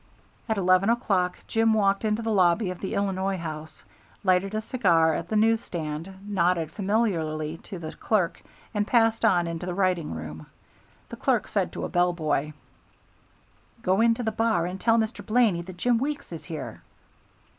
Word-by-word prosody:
At 220 - +1
eleven 185 +1 +3
o'clock 195 -6 +1
Jim 225 0 +2
walked 200 -1 +2
into 215 +1 0
the 225 - -1
lobby 185 0 +3
of 180 - -8
the 190 - -4
Illinois 195 -1 0
House, 155 -2 -7 0.4
lighted 190 +2 +2
a - - +1
cigar 170 -10 +3
at 170 - -4
the 220 - -1
news 225 +1 +4
stand, 165 +3 -5
nodded 175 -5 +1
familiarly 165 -7 -1
to 190 +3 -9
the 160 -2 -6
clerk, 190 -6 0 0.3
and 210 -1 0
passed 225 -2 +3
on 175 -2 +4
into 170 +1 -4
the 180 - -3
writing 180 - 0
room. 80 0 -8 0.6
The - - -8
clerk - - +1
said - - -1
to - - -4
a - - -5
bell 175 0 +2
boy, 155 -2 -1 1.3
"Go 190 +1 +2
into 230 +1 +3
the 220 - 0
bar 220 -6 +1
and 185 +2 -5
tell 230 0 +4
Mr. 220 +1 -1
Blaney 220 -6 +2
that 180 +1 -10
Jim 240 +5 +2
Weeks 280 -2 -3
is 165 - -8
here." 160 -4 -7
190 Hz, 175 wpm, -26 LUFS, 170-220 Hz, 1.3 s, news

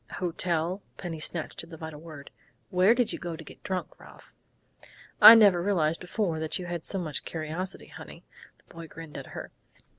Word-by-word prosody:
"Hotel?" 175 0 -1 0.2
Penny 170 -4 -6
snatched 155 +1 -3
at 165 - -13
the 165 - -10
vital 160 -1 -8
word. 155 -4 -11 0.4
"Where 185 +5 +5
did 245 -2 +1
you - - -5
go 170 -1 -5
to 160 - -10
get - - -14
drunk, 185 -2 -5
Ralph?" - - -16 0.9
"I 230 - +13
never 200 -6 +6
realized 165 -4 +1
before 180 -3 -2
you 160 +3 -2
had 175 -2 -5
so 195 - -2
much 160 -5 -2
curiosity, 165 +4 -5
honey," - - -12 0.3
the - - -22
boy 165 -1 -9
grinned 165 -1 -9
at - - -10
her. - - -7
170 Hz, 180 wpm, -28 LUFS, 160-185 Hz, 0.9 s, I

